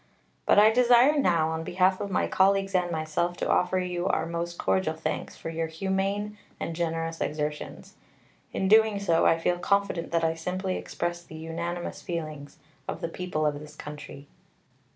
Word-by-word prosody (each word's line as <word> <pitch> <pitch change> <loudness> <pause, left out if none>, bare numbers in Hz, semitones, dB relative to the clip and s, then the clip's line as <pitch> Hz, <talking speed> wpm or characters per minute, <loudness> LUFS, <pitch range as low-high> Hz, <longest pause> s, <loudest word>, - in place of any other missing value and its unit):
But - - +5
I 215 +1 +8
desire 245 +4 +5
now, 170 - +3
on 160 0 -3
behalf 185 +2 +2
of 200 - -3
my 190 - +1
colleagues 195 0 +2
and 180 -1 +2
myself, 165 +2 -1
to - - -2
offer 180 +1 +2
you 180 0 -1
our - - +1
most 170 +1 -4
cordial 185 -4 +1
thanks 160 - -4
for 165 - -6
your 165 0 -2
humane 195 +5 -2 0.2
and 165 - -4
generous 165 -1 -2
exertions. 150 0 -4 0.6
In 190 - -1
doing 220 0 +5
so, 170 -5 +3
I 165 - +4
feel 175 +1 0
confident 200 -2 0
that 165 -1 +1
I 160 0 +2
simply 185 +3 -3
express 175 0 -3
the 160 - -12
unanimous 170 +2 -4
feelings 155 -4 -5 0.3
of - - -4
the 165 - -2
people 170 -3 -2
of 145 -1 0
this 150 0 -11
country." 150 -2 -9
175 Hz, 175 wpm, -27 LUFS, 160-190 Hz, 0.6 s, I